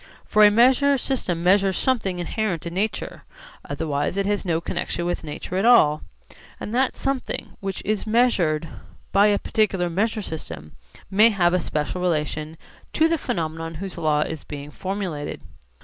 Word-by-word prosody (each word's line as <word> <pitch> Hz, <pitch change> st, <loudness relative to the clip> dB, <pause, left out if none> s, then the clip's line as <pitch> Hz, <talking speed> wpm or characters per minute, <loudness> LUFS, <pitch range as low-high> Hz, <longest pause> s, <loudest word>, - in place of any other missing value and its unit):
For 215 Hz, 0 st, +4 dB
a 210 Hz, -, +9 dB
measure 260 Hz, +6 st, +4 dB
system 190 Hz, -11 st, -2 dB
measures 190 Hz, +1 st, +3 dB
something 215 Hz, -8 st, 0 dB
inherent 175 Hz, -1 st, -2 dB
in 170 Hz, -, -5 dB
nature; 210 Hz, +4 st, -3 dB, 0.4 s
otherwise 145 Hz, +4 st, -2 dB
it 200 Hz, -, +1 dB
has 205 Hz, 0 st, 0 dB
no 170 Hz, -4 st, 0 dB
connexion 175 Hz, 0 st, -3 dB
with 175 Hz, -1 st, -2 dB
nature 160 Hz, +4 st, -5 dB
at 190 Hz, -, +1 dB
all. 155 Hz, -11 st, +5 dB, 0.6 s
And 210 Hz, -, -6 dB
that 255 Hz, +2 st, +1 dB
something 270 Hz, -1 st, -3 dB
which 195 Hz, -2 st, -5 dB
is 215 Hz, +1 st, -1 dB
measured 190 Hz, -10 st, +2 dB, 0.4 s
by 200 Hz, +1 st, +5 dB
a 205 Hz, -1 st, +3 dB
particular 195 Hz, -6 st, 0 dB
measure 215 Hz, +4 st, 0 dB
system 80 Hz, -, -7 dB, 0.4 s
may 215 Hz, +4 st, +6 dB
have 180 Hz, -5 st, +2 dB
a 180 Hz, -, +3 dB
special 155 Hz, +2 st, -2 dB
relation 155 Hz, -2 st, -1 dB, 0.4 s
to 320 Hz, -, +4 dB
the 330 Hz, -1 st, 0 dB
phenomenon 165 Hz, -8 st, -3 dB
whose 190 Hz, +2 st, -6 dB
law 155 Hz, -3 st, +1 dB
is 160 Hz, 0 st, -3 dB
being 145 Hz, 0 st, -8 dB
formulated. 185 Hz, -6 st, -4 dB
185 Hz, 160 wpm, -23 LUFS, 160-215 Hz, 0.6 s, a